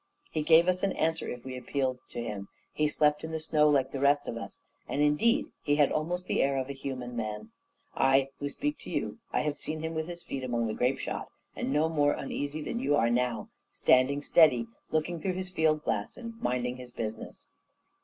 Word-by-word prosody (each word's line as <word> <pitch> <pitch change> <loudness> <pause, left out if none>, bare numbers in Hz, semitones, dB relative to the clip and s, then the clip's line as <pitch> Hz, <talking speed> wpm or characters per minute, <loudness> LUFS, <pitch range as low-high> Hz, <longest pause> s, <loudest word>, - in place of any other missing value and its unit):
He 155 - -1
gave 165 +3 +6
us 185 0 +2
an 195 -1 +1
answer 160 +1 0
if 125 0 -7
we 130 -1 -5
appealed 130 0 -1
to 120 - -4
him; 100 -3 -5 0.3
he 150 - +2
slept 150 0 +2
in 160 - -4
the 160 0 -3
snow 155 -1 +3
like 135 -2 +2
the 135 - -4
rest 145 +1 +3
of - - -3
us; 115 - -7 0.3
and, - - -2
indeed, 150 +11 +3
he 145 - +2
had 145 -2 +4
almost 175 +4 -1
the - - +1
air 135 0 +2
of 130 +1 -2
a - - -4
human 130 -3 -5
man. 105 -2 -4 0.4
I 135 0 +3
who 145 - -2
speak 295 - -3
to - - -10
you, - - -2
I - - +1
have 150 -1 -2
seen 155 0 -4
him 160 +1 -3
with 160 0 -2
his 175 -1 -7
feet 135 -1 -5
among 120 -2 0
the 110 - -2
grape 125 +4 +1
shot, - - -4 0.3
and - - -2
no 155 +2 +3
more 145 -3 +2
uneasy 145 +2 -4
than 235 - -3
you 145 - +2
are 115 -4 +3
now 125 0 0 0.2
standing 140 +3 +3
steady, 135 -9 +5 0.2
looking 160 +2 -1
through 185 +3 -1
his 185 0 -4
field 155 -3 +2
glass, 100 0 -2
and 230 -2 -7
minding 125 0 -1
his 125 -1 -10
business. 110 -2 -6
145 Hz, 220 wpm, -29 LUFS, 125-160 Hz, 0.4 s, gave